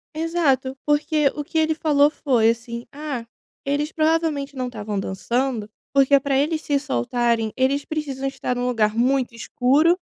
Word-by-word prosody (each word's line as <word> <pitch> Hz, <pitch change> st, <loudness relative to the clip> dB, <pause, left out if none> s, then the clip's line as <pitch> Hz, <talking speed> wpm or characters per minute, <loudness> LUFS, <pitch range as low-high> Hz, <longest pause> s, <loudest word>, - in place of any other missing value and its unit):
Exato. 310 Hz, -5 st, 0 dB
Porque 295 Hz, 0 st, +2 dB
o 295 Hz, -, -4 dB
que 320 Hz, -, -2 dB
ele 315 Hz, 0 st, +2 dB
falou 295 Hz, -2 st, +3 dB
foi 240 Hz, -7 st, +2 dB
assim: 235 Hz, 0 st, -5 dB
"Ah, 285 Hz, -5 st, -5 dB, 0.4 s
eles 290 Hz, +2 st, -1 dB
provavelmente 310 Hz, -3 st, 0 dB
não 255 Hz, -1 st, -2 dB
estavam 210 Hz, -4 st, -4 dB
dançando, 225 Hz, +3 st, -2 dB, 0.2 s
porque 275 Hz, 0 st, +5 dB
pra 275 Hz, 0 st, -1 dB
eles 310 Hz, +2 st, 0 dB
se 285 Hz, -1 st, +1 dB
soltarem 225 Hz, -, 0 dB
eles 275 Hz, +2 st, +1 dB
precisam 280 Hz, -4 st, -4 dB
estar 255 Hz, -2 st, -3 dB
num 245 Hz, 0 st, -1 dB
lugar 220 Hz, -3 st, +1 dB
muito 250 Hz, 0 st, +1 dB
escuro, 285 Hz, +9 st, +2 dB
275 Hz, 155 wpm, -22 LUFS, 240-300 Hz, 0.4 s, porque